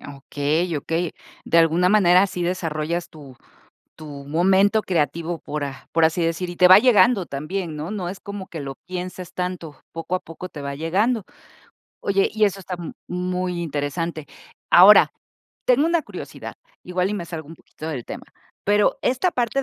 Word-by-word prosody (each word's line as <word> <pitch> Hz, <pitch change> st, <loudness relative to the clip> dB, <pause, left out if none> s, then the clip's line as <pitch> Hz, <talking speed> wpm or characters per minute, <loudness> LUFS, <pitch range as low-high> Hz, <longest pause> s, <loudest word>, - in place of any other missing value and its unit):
Okey, 150 Hz, +5 st, -1 dB
okey, 165 Hz, +3 st, -2 dB, 0.3 s
de 170 Hz, -, +1 dB
alguna 165 Hz, +2 st, +4 dB
manera 185 Hz, -2 st, +5 dB
sí 180 Hz, -2 st, -4 dB
desarrollas 170 Hz, -1 st, -2 dB
tu 140 Hz, -5 st, -13 dB, 0.6 s
tu 145 Hz, -3 st, -9 dB
momento 190 Hz, +7 st, +3 dB
creativo, 165 Hz, 0 st, -1 dB
por 150 Hz, -1 st, -5 dB
a 135 Hz, -2 st, -8 dB
por 165 Hz, 0 st, +3 dB
así 165 Hz, +2 st, +2 dB
decir, 170 Hz, +2 st, -2 dB
y 175 Hz, -, -8 dB
te 180 Hz, -, +6 dB
va 185 Hz, -, +10 dB
llegando 235 Hz, -5 st, +4 dB
también, 160 Hz, +4 st, -4 dB
¿no?, 155 Hz, +4 st, -5 dB
no 185 Hz, -4 st, -3 dB
es 190 Hz, -, -6 dB
como 200 Hz, -2 st, -7 dB
que 165 Hz, -, -7 dB
lo 135 Hz, -1 st, -6 dB
pienses 180 Hz, 0 st, -6 dB
tanto, 180 Hz, -4 st, -5 dB
poco 165 Hz, +2 st, -3 dB
a -, -, -6 dB
poco 170 Hz, +3 st, -9 dB
te 145 Hz, -4 st, -9 dB
va 140 Hz, 0 st, -4 dB
llegando. 200 Hz, -, 0 dB, 0.8 s
Oye, 195 Hz, 0 st, +1 dB
y 215 Hz, -1 st, +2 dB
eso 195 Hz, -1 st, 0 dB
está 185 Hz, 0 st, -6 dB
m 170 Hz, -, -6 dB, 0.2 s
muy 180 Hz, 0 st, -2 dB
interesante. 155 Hz, +1 st, -3 dB, 0.4 s
Ahora, 190 Hz, +4 st, +8 dB, 0.5 s
tengo 260 Hz, +5 st, +4 dB
una 335 Hz, -1 st, +1 dB
curiosidad, -, -, -8 dB, 0.3 s
igual 180 Hz, +1 st, -1 dB
y -, -, -2 dB
me 180 Hz, -4 st, -4 dB
salgo 160 Hz, -3 st, -7 dB
un 165 Hz, -, -9 dB
poquito 155 Hz, -, -10 dB
del 135 Hz, -7 st, -4 dB
tema, -, -, -8 dB, 0.4 s
pero 205 Hz, +1 st, +2 dB
esta 260 Hz, +9 st, +1 dB
parte 250 Hz, 0 st, -1 dB
175 Hz, 175 wpm, -22 LUFS, 160-190 Hz, 0.8 s, va